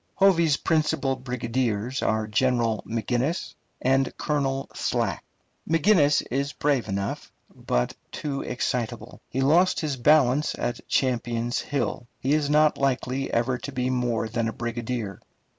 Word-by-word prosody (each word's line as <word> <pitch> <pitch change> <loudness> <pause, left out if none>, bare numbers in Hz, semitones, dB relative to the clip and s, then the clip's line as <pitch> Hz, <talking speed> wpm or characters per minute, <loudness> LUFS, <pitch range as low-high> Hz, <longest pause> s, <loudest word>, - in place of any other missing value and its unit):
Hovey's 170 -6 +4
principal 150 -4 +1
brigadiers 125 -1 -2
are 110 0 +1
General 115 0 +1
McGinnis 120 - -1 0.3
and 135 +1 +2
Colonel 135 -2 -1
Slack. - - -1 0.5
McGinnis 160 -2 +4
is 140 +2 -1
brave 135 -6 0
enough, 100 0 -3 0.2
but - - -1 0.2
too 140 -2 -3
excitable. 125 -2 -3
He 135 - -1
lost 170 +7 +4
his 150 -4 -2
balance 145 +1 +3
at 120 0 -3
Champion's 120 -2 0
Hill. 140 -4 -2
He 135 +3 +1
is 150 -2 +1
not 150 0 +4
likely 135 0 0
ever 125 +2 +1
to 140 - -6
be 130 -1 -1
more 120 -3 0
than 115 0 -1
a 110 - -3
brigadier. 120 -3 -4
130 Hz, 130 wpm, -25 LUFS, 120-145 Hz, 0.5 s, Hovey's